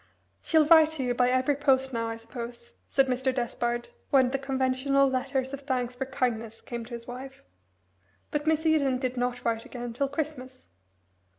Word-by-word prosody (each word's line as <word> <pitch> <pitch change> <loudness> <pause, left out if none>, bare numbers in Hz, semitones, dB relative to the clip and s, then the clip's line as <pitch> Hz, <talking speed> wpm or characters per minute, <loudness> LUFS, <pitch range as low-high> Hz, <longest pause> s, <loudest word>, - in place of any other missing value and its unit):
"She'll 315 -2 +4
write 320 0 +7
to 290 -4 -3
you 245 -1 +1
by 245 0 +3
every 255 +3 +2
post 265 -2 +2
now, 230 -1 -1
I 225 - -3
suppose," 235 - -8 0.2
said 270 - +4
Mr. 260 0 0
Despard 240 -1 -2 0.2
when 260 -3 +4
the 275 - -1
conventional 270 +1 +2
letter 265 +1 -1
of 265 +2 -7
thanks 255 -3 -1
for 265 +1 -3
kindness 230 -4 -2
came 235 -1 -6
to 240 - -11
his 235 0 -9
wife. 255 +2 -9 0.9
But 295 +1 -2
Miss 315 0 +2
Eden 285 -5 +3
did 255 -1 -2
not 245 0 -2
write 230 -1 0
again 240 -1 -6
till 275 +3 -1
Christmas. 275 -3 -5
260 Hz, 180 wpm, -28 LUFS, 245-275 Hz, 0.9 s, write